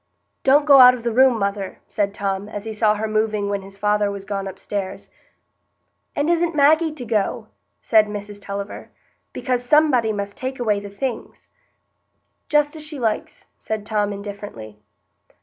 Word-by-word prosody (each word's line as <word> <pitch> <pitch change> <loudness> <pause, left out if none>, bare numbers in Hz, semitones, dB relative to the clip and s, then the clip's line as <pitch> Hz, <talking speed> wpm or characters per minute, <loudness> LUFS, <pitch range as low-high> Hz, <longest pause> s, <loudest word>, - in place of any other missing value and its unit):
"Don't 285 +2 +5
go 280 -2 +8
out 250 0 +9
of 240 - -10
the 235 -1 -1
room, 260 0 +5
mother," 200 -1 -3
said 200 -1 -1
Tom, 200 0 -3
as 205 -1 -6
he 220 - -4
saw 215 0 +2
her 215 +1 -2
moving 215 -1 0
when 200 -1 -2
his 195 0 -11
father 210 0 +1
was 200 -1 -6
gone 195 -1 -3
upstairs. 195 0 -5 1.1
"And 290 +1 0
isn't 340 -1 +1
Maggie 310 +3 +4
to 285 -5 -8
go?" 215 -3 -1 0.3
said 215 -1 +4
Mrs 205 0 -7
Tulliver; 200 0 -6 0.4
"because 250 -2 -2
somebody 255 -4 +3
must 200 -1 -5
take 260 0 -5
away 215 -4 +1
the 200 0 -8
things." 235 +4 -6 1.0
"Just 295 0 +2
as 310 - -8
she 305 -1 -7
likes," 220 -3 -2
said 215 -1 -4
Tom 210 -1 0
indifferently. 200 - -8
215 Hz, 165 wpm, -21 LUFS, 200-255 Hz, 1.1 s, out